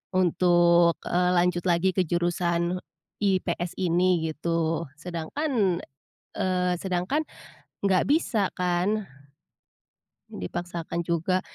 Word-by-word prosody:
untuk, 175 Hz, -1 st, +4 dB
eee, 180 Hz, 0 st, +1 dB
lanjut 175 Hz, 0 st, +2 dB
lagi 175 Hz, +2 st, +3 dB
ke 185 Hz, -4 st, +1 dB
jurusan 175 Hz, +1 st, 0 dB, 0.4 s
IPS 185 Hz, -3 st, 0 dB
ini?" 175 Hz, -2 st, +2 dB
gitu. 165 Hz, +1 st, -1 dB
Sedangkan, 180 Hz, -, -1 dB, 0.5 s
eee, 180 Hz, -1 st, +1 dB
sedangkan 190 Hz, -, -1 dB, 0.6 s
enggak 190 Hz, -2 st, +3 dB
bisa 250 Hz, -, +2 dB
kan, 180 Hz, +4 st, 0 dB, 1.2 s
dipaksakan 170 Hz, -, -5 dB
juga. 170 Hz, +2 st, +1 dB
175 Hz, 90 wpm, -26 LUFS, 170-185 Hz, 1.2 s, untuk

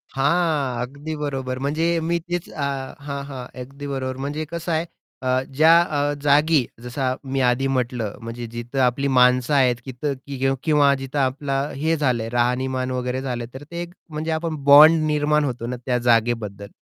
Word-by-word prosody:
हां, 140 Hz, -4 st, +1 dB
अगदी 140 Hz, +5 st, -5 dB
बरोबर. 135 Hz, -3 st, -3 dB
म्हणजे 155 Hz, +4 st, 0 dB
मी 170 Hz, +1 st, 0 dB
तेच 175 Hz, +1 st, -4 dB
अ 150 Hz, -, -6 dB, 0.4 s
हां, 140 Hz, -1 st, -4 dB
हां, 135 Hz, -3 st, -7 dB, 0.2 s
अगदी 140 Hz, +2 st, -9 dB
बरोबर. 130 Hz, -1 st, -3 dB
म्हणजे 150 Hz, +3 st, -3 dB
कसं 170 Hz, 0 st, -4 dB
आहे 160 Hz, +1 st, 0 dB, 0.4 s
अ, 130 Hz, 0 st, +2 dB
ज्या 160 Hz, +3 st, +6 dB
अ, 145 Hz, -3 st, 0 dB
जागी 150 Hz, +2 st, +4 dB, 0.2 s
जसं 130 Hz, +1 st, -2 dB, 0.2 s
मी 135 Hz, -, +1 dB
आधी 125 Hz, +2 st, +2 dB
म्हटलं, 125 Hz, -5 st, -2 dB
म्हणजे 115 Hz, +1 st, -6 dB
जिथं 120 Hz, +3 st, -5 dB
आपली 130 Hz, +2 st, +2 dB
माणसं 125 Hz, +2 st, +4 dB
आहेत 130 Hz, -3 st, +4 dB
तिथं 135 Hz, +3 st, -3 dB
किं 135 Hz, -1 st, 0 dB
किंवा 145 Hz, -3 st, +4 dB
जिथं 135 Hz, +1 st, -4 dB
आपलं 135 Hz, +1 st, -1 dB
हे 160 Hz, +4 st, +1 dB
झालं 130 Hz, -7 st, +1 dB
आहे, 115 Hz, -, -5 dB
राहणीमान 130 Hz, +2 st, 0 dB
वगैरे 125 Hz, +1 st, -2 dB
झालं, 125 Hz, -3 st, -3 dB
तर 130 Hz, -, -9 dB
ते 170 Hz, -, -4 dB
एक 175 Hz, 0 st, -7 dB, 0.2 s
म्हणजे 155 Hz, +1 st, -3 dB
आपण 160 Hz, 0 st, -2 dB
बॉन्ड 155 Hz, +3 st, +8 dB
निर्माण 150 Hz, 0 st, +2 dB
होतो 125 Hz, -4 st, -3 dB
ना, 125 Hz, -, -3 dB
त्या 125 Hz, -2 st, +1 dB
जागेबद्दल. 110 Hz, -3 st, +1 dB
135 Hz, 175 wpm, -22 LUFS, 125-150 Hz, 0.4 s, बॉन्ड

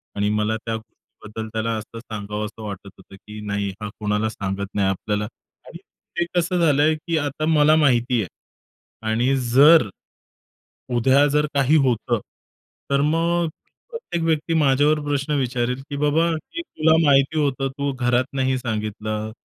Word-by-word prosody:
आणि 105 Hz, 0 st, 0 dB
मला 105 Hz, +1 st, 0 dB
त्या 115 Hz, 0 st, -4 dB
गोष्टीबद्दल 110 Hz, 0 st, -10 dB
त्याला 115 Hz, +1 st, -1 dB
असं 110 Hz, +1 st, -8 dB
सांगावसं 105 Hz, 0 st, -6 dB
वाटत 100 Hz, -1 st, -7 dB
होतं, 95 Hz, 0 st, -15 dB
की 105 Hz, +2 st, -11 dB
नाही 100 Hz, 0 st, -1 dB
हा 105 Hz, -, -4 dB
कोणाला 105 Hz, +1 st, 0 dB
सांगत 100 Hz, -2 st, -4 dB
नाही 100 Hz, -2 st, +1 dB
आपल्याला. 105 Hz, +2 st, -2 dB, 0.4 s
आणि 170 Hz, -, -9 dB, 0.4 s
ते 175 Hz, -, +2 dB
कसं 175 Hz, +1 st, +1 dB
झालंय, 155 Hz, -1 st, +3 dB
की 165 Hz, +1 st, -3 dB
आता 145 Hz, +1 st, -2 dB
मला 155 Hz, -1 st, +4 dB
माहिती 125 Hz, -5 st, +3 dB
आहे. 95 Hz, -, -4 dB, 0.8 s
आणि 125 Hz, +5 st, +2 dB, 0.2 s
जर 145 Hz, -1 st, +7 dB, 1.1 s
उद्या 135 Hz, +4 st, +4 dB
जर 150 Hz, +1 st, +2 dB
काही 140 Hz, +2 st, +3 dB
होतं. 120 Hz, -1 st, 0 dB, 0.7 s
तर 140 Hz, 0 st, +3 dB
मग 165 Hz, +3 st, +1 dB, 0.4 s
प्रत्येक 465 Hz, -, -4 dB
व्यक्ती 160 Hz, 0 st, 0 dB
माझ्यावर 150 Hz, 0 st, +3 dB
प्रश्न 145 Hz, 0 st, -1 dB
विचारेल, 125 Hz, 0 st, -1 dB
की 145 Hz, -, -4 dB
"बाबा 150 Hz, +3 st, +2 dB
हे 165 Hz, -, -4 dB
तुला 160 Hz, -, +2 dB
माहिती 140 Hz, +2 st, +3 dB
होतं. 135 Hz, -2 st, 0 dB
तू 140 Hz, 0 st, -1 dB
घरात 125 Hz, -1 st, +1 dB
नाही 130 Hz, -1 st, +1 dB
सांगितलं. 110 Hz, -2 st, -3 dB
130 Hz, 150 wpm, -22 LUFS, 110-150 Hz, 1.1 s, जर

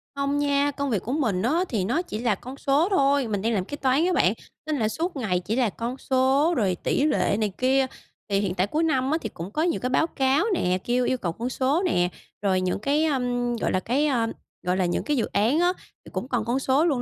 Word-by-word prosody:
Không 280 Hz, +1 st, 0 dB
nha, 285 Hz, 0 st, +2 dB
công 280 Hz, 0 st, -3 dB
việc 210 Hz, -6 st, 0 dB
của 240 Hz, -, -4 dB
mình 225 Hz, -11 st, 0 dB
á, 300 Hz, -, +1 dB
thì 200 Hz, -6 st, -1 dB
nó 270 Hz, -, +1 dB
chỉ 285 Hz, -12 st, -6 dB
là 230 Hz, -4 st, +1 dB
con 255 Hz, +6 st, -10 dB
số 285 Hz, +5 st, +2 dB
thôi, 280 Hz, -, +2 dB
mình 205 Hz, -3 st, -2 dB
đang 230 Hz, +1 st, 0 dB
làm 190 Hz, -3 st, 0 dB
kế 290 Hz, -, -6 dB
toán 270 Hz, +4 st, +2 dB
á 365 Hz, -, +1 dB
bạn, -, -, +3 dB, 0.3 s
nên 305 Hz, -2 st, 0 dB
là 220 Hz, -, +2 dB
suốt 335 Hz, +8 st, -3 dB
ngày 205 Hz, -9 st, 0 dB
chỉ 205 Hz, +5 st, -3 dB
là 245 Hz, -3 st, +2 dB
con 235 Hz, +5 st, -5 dB
số 270 Hz, +6 st, +2 dB
rồi 190 Hz, -6 st, +1 dB
tỷ 280 Hz, -, +1 dB
lệ 305 Hz, -, +2 dB
này 210 Hz, -2 st, 0 dB
kia. 265 Hz, +1 st, +3 dB, 0.4 s
Thì 195 Hz, -1 st, +2 dB
hiện 195 Hz, -3 st, -1 dB
tại 185 Hz, +2 st, +1 dB
cuối 310 Hz, +8 st, 0 dB
năm 270 Hz, -4 st, +1 dB
á, 315 Hz, -, +2 dB
thì 220 Hz, -, -4 dB
cũng 175 Hz, 0 st, -8 dB
có 305 Hz, -, -1 dB
nhiều 340 Hz, +1 st, +1 dB
cái 250 Hz, -, -1 dB
báo 315 Hz, +5 st, +2 dB
cáo 275 Hz, +4 st, +1 dB
nè, 185 Hz, -, +1 dB
kêu 245 Hz, +1 st, +1 dB
yêu 255 Hz, -, +1 dB
cầu 175 Hz, -7 st, -2 dB
con 235 Hz, +8 st, -4 dB
số 275 Hz, +8 st, +1 dB
nè, 180 Hz, -, +2 dB, 0.3 s
rồi 190 Hz, -2 st, +1 dB
những 185 Hz, +1 st, -1 dB
cái, 285 Hz, +7 st, +1 dB
ơm, 245 Hz, -4 st, 0 dB
gọi 230 Hz, -, -1 dB
là, 185 Hz, -, +1 dB
cái, 265 Hz, +10 st, +1 dB
ờ, 235 Hz, -5 st, +1 dB, 0.4 s
gọi 180 Hz, +1 st, +2 dB
là, 185 Hz, -, +2 dB
những 175 Hz, -, -1 dB
cái 295 Hz, -2 st, 0 dB
dự 225 Hz, -, +1 dB
án 230 Hz, +10 st, +1 dB
á, 355 Hz, +1 st, +3 dB, 0.3 s
thì -, -, -12 dB
cũng 255 Hz, -, -3 dB
còn 240 Hz, -5 st, -1 dB
con 245 Hz, +3 st, 0 dB
số 270 Hz, +4 st, +2 dB
luôn. 280 Hz, -7 st, +1 dB
255 Hz, 265 wpm, -25 LUFS, 215-285 Hz, 0.4 s, bạn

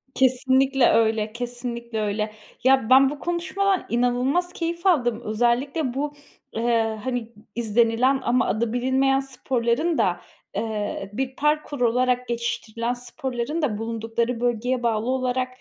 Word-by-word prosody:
Kesinlikle 260 Hz, 0 st, +3 dB
öyle, 220 Hz, -1 st, +2 dB
kesinlikle 235 Hz, -1 st, -4 dB
öyle. 210 Hz, +1 st, -2 dB, 0.3 s
Ya, 260 Hz, -3 st, +4 dB
ben 265 Hz, +1 st, +7 dB
bu 290 Hz, -, -6 dB
konuşmadan 370 Hz, +3 st, 0 dB
inanılmaz 250 Hz, +9 st, +1 dB
keyif 340 Hz, +1 st, -4 dB
aldım. 245 Hz, -10 st, +2 dB
Özellikle 245 Hz, +5 st, 0 dB
bu, 290 Hz, +2 st, -2 dB, 0.4 s
eee, 225 Hz, -1 st, 0 dB
hani, 245 Hz, -3 st, -3 dB, 0.2 s
izlenilen 235 Hz, +3 st, +2 dB
ama 250 Hz, +1 st, +2 dB
adı 225 Hz, +3 st, -1 dB
bilinmeyen 265 Hz, +2 st, +2 dB
sporların 265 Hz, +3 st, -1 dB
da, -, -, +1 dB, 0.3 s
eee, 210 Hz, -3 st, -3 dB
bir 265 Hz, +3 st, -3 dB
parkur 300 Hz, -2 st, 0 dB
olarak 250 Hz, +1 st, +2 dB
geçiştirilen 235 Hz, 0 st, -2 dB
sporların 255 Hz, +3 st, -3 dB
da 235 Hz, -8 st, 0 dB
bulundukları 230 Hz, +1 st, -2 dB
bölgeye 245 Hz, +1 st, 0 dB
bağlı 230 Hz, +1 st, 0 dB
olarak 255 Hz, 0 st, 0 dB
245 Hz, 125 wpm, -24 LUFS, 230-270 Hz, 0.4 s, ben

